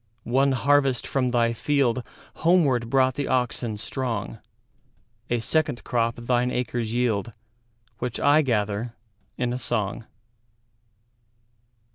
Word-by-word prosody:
One 135 +3 +2
harvest 135 0 +2
from 130 -2 0
thy 120 -1 +2
fieldHomeward 135 +1 +1
brought 130 0 +3
the 140 +2 -3
oxen 125 -3 -1
strong;A 115 0 -6
second 155 -1 0
crop 115 -1 0
thine 120 +1 0
acres 120 -2 -2
yield, 115 -2 0 0.7
Which 125 -1 -3
I 145 +2 +5
gather 110 -3 -1 0.4
in 125 -1 -1
a 125 - -3
song. 110 -3 -2
125 Hz, 100 wpm, -25 LUFS, 115-130 Hz, 0.7 s, I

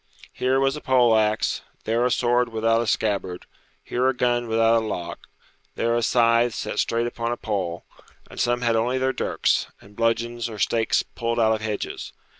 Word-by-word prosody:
Here 130 +1 +1
was 135 +1 +1
a 150 - -7
pole 125 -3 +4
axe, 110 0 +1 0.2
there 115 +2 0
a 125 - +2
sword 120 0 +2
without 115 0 +1
a 120 - -3
scabbard; 100 -5 -1 0.4
here 125 +1 0
a 130 - -1
gun 120 -1 0
without 115 0 +3
a - - -5
lock, 85 -4 -6 0.5
there 115 0 0
a 120 - +1
scythe 115 0 +3
set - - -4
straight 115 0 +1
upon 120 0 -3
a 120 - -2
pole; 95 -6 -3 0.4
and - - -11
some 120 0 +1
had 115 -1 +1
only 120 +3 +1
their 130 0 0
dirks, - - 0
and 105 +1 -18
bludgeons 115 +1 -1
or 110 - -8
stakes 115 +2 +1
pulled 115 0 -3
out 110 -1 +4
of 110 - -3
hedges. 110 -1 -4
115 Hz, 190 wpm, -24 LUFS, 110-120 Hz, 0.5 s, pole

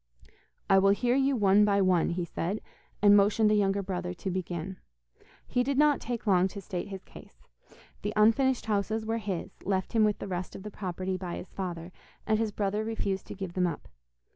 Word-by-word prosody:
'I 195 - +6
will 195 +1 +4
hear 245 0 +2
you 275 0 +2
one 205 -2 +5
by 200 -1 +3
one,' 185 -3 +3
he 175 0 -2
said, 180 +5 -3 0.4
and 205 0 +8
motioned 210 +2 +4
the - - +4
younger 200 -1 +1
brother 180 -1 -4
to 190 +2 -4
begin. 180 0 -4 0.7
He 250 - 0
did 270 +2 0
not 295 -1 +4
take 235 -1 -4
long 185 -3 +4
to 200 - -8
state 180 -2 -5
his 195 -2 -8
case. - - -15 0.6
The 205 - -2
unfinished 235 +5 +3
houses 215 +1 -1
were 225 +1 -1
his, 195 -5 -4
left 190 +1 -1
him 225 -2 +4
with 210 -1 +2
the - - -6
rest 180 -1 -4
of 190 - -8
the 210 - -7
property 185 -1 -3
by 180 -2 -5
his 180 - -9
father, 175 -2 -5 0.3
and 215 0 +2
his 225 -2 0
brother 205 +1 -1
refused 200 -4 -3
to - - -7
give 190 -3 -6
them 180 -1 +1
up. 165 - -5
200 Hz, 205 wpm, -29 LUFS, 185-215 Hz, 0.7 s, and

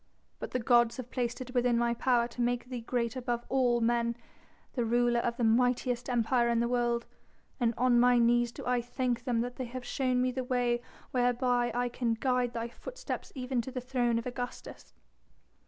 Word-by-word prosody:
But - - -5
the - - -1
gods 240 -1 +3
have 250 -1 -7
placed 245 -1 -2
it 250 0 -7
within 245 -1 +2
my 235 0 +2
power 235 0 +2
to 245 - -5
make 245 0 0
thee 250 -2 -4
great 235 +1 -1
above 240 -2 -2
all 245 -3 +2
men, 235 0 +1 0.6
the 245 - 0
ruler 240 +1 +2
of 235 0 -1
the 240 - -1
mightiest 245 +2 +2
Empire 240 0 +2
in 235 -1 +2
the 235 - +1
world, 240 -1 0 0.5
and 235 -2 +1
on 245 -1 +4
my 245 0 +5
knees 240 0 +3
do - - -9
I 245 -1 +1
thank 245 0 -2
them 240 -3 +1
that 245 +1 -4
they 260 - -3
have 245 +1 -7
shown 255 -2 0
me 255 0 +2
the 260 +1 -3
way 245 -1 0 0.3
whereby 245 -1 +1
I 245 0 +1
can 240 -1 -1
guide 250 0 0
thy 230 0 -3
footsteps - - -7
even 250 -1 -1
to 235 - -7
the 255 - -3
throne 245 -2 0
of 230 - -3
Augustus." 245 0 -7
245 Hz, 200 wpm, -30 LUFS, 235-250 Hz, 0.6 s, my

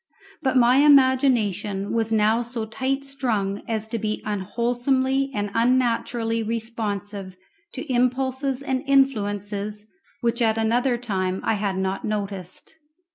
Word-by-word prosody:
But 265 -3 +1
my 245 +1 +5
imagination 255 -9 +3
was 225 -1 0
now 220 +1 +3
so 235 -1 -4
tight 265 +5 -2
strung 225 -8 -1
as 220 -1 -1
to 230 - -2
be 215 0 -3
unwholesomely 245 +6 0
and 205 -4 -3
unnaturally 235 -1 +1
responsive 210 -4 -4 0.4
to 265 -1 -4
impulses 260 +2 0
and 260 -2 -1
influences 210 -6 0 0.4
which 235 0 0
at 225 -1 +2
another 240 +3 +1
time 190 -5 -2
I - - +1
had 200 -2 -1
not 190 0 -2
noticed. 200 - -5
230 Hz, 125 wpm, -24 LUFS, 205-260 Hz, 0.4 s, my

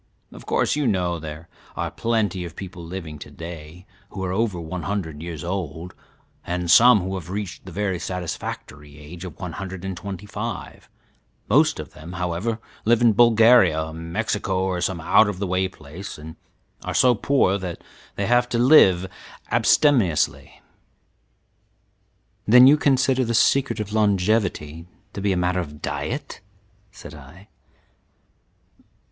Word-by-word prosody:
Of - - -13
course, - - +1
you 150 -3 0
know 90 -5 0
there 80 +1 -8 0.3
are - - -3
plenty 105 -6 -1
of 85 -1 -8
people 90 -3 -8
living 85 -3 -7
to 75 - -10
day 85 +3 -10 0.2
who 95 - -6
are 90 - -2
over 100 -2 -1
one 85 +2 -5
hundred 85 -7 -4
years 80 -3 -6
old, 85 -1 -5 0.5
and 90 -1 -2
some 120 -1 +7
who 95 +2 -4
have 90 -3 -6
reached 100 -1 -6
the - - -8
very 95 -3 -2
satisfactory 75 -5 -6
age 80 +5 -10
of 90 - -10
one 90 -2 -5
hundred 95 +1 -7
and 95 -1 -4
twenty 95 +2 -7
five; 105 - -7 0.6
most - - +3
of - - -8
them, 80 +3 -10
however, 90 +6 -2 0.3
live 115 +1 +3
in 115 -2 +5
Bulgaria, 110 -9 +5
Mexico, 95 +3 -2
or 90 -2 -2
some 90 0 -1
out 95 +6 +4
of 100 - -5
the 100 - -2
way 95 0 0
place, 90 +4 -10
and 80 +1 -10 0.5
are - - -4
so 125 -1 +5
poor 105 -5 +1
that 90 -3 -6 0.3
they - - -2
have 120 +1 +2
to 120 - -1
live 115 - +6 0.5
abstemiously." 115 - +2 1.8
"Then 125 +4 +8
you 140 +3 +8
consider 135 -2 +2
the 115 -1 -1
secret 125 -1 +2
of 105 0 -5
longevity 95 -6 0 0.3
to 100 - -6
be 100 0 +1
a 95 - 0
matter 90 +1 0
of 75 -4 -6
diet?" - - -5 0.5
said 100 - -12
I. 80 +8 -14
95 Hz, 150 wpm, -23 LUFS, 85-110 Hz, 1.8 s, Then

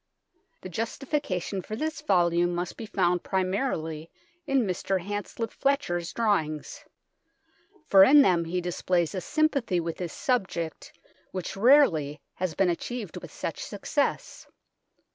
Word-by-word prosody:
The 185 - -7
justification 225 - -2
for 215 - -6
this 310 +4 -3
volume 175 - +2
must 175 0 -3
be 225 - -7
found 180 -3 +1
primarily 185 - -2 0.4
in 270 -4 +2
Mr. 190 0 -1
Hanslip 205 +4 -4
Fletcher's 175 - 0
drawings, 160 -10 -1 1.0
for 195 -1 +8
in 285 +7 +8
them 175 -5 +3
he 180 +2 -2
displays 175 0 0
a 185 - -3
sympathy 280 - +1
with 165 -1 -4
his 175 -3 -4
subject 190 -10 -2 0.4
which 185 -2 -5
rarely 195 - +4
has 180 -4 -3
been 190 -2 +3
achieved 215 +2 -5
with - - -9
such - - -5
success. - - -2
185 Hz, 125 wpm, -27 LUFS, 175-235 Hz, 1.0 s, for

